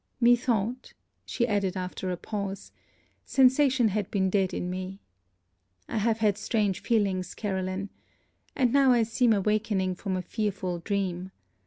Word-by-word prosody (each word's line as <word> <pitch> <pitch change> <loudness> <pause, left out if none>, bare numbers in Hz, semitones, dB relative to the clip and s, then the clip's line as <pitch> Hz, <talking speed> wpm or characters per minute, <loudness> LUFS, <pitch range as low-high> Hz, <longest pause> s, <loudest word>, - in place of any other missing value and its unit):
Methought 240 -1 +2 0.2
' - - -48
she 235 - 0
added 200 -4 0
after 185 0 -4
a 180 - -2
pause 200 0 -5 0.5
'sensation 260 -2 +4
had 205 -1 -2
been 190 -2 0
dead 190 -2 +2
in 180 - -3
me 185 +1 -5 0.9
I - - -2
have 220 +1 +1
had 210 -2 +1
strange 210 -3 0
feelings, 195 -5 0
Caroline. 190 -1 -3 0.6
And 250 -3 +2
now 275 -2 +5
I 235 -2 +4
seem 230 +2 +2
awakening 205 -2 +1
from 185 +1 -3
a 180 - -3
fearful 190 -3 -2
dream. 185 -1 -2
205 Hz, 145 wpm, -27 LUFS, 185-230 Hz, 0.9 s, now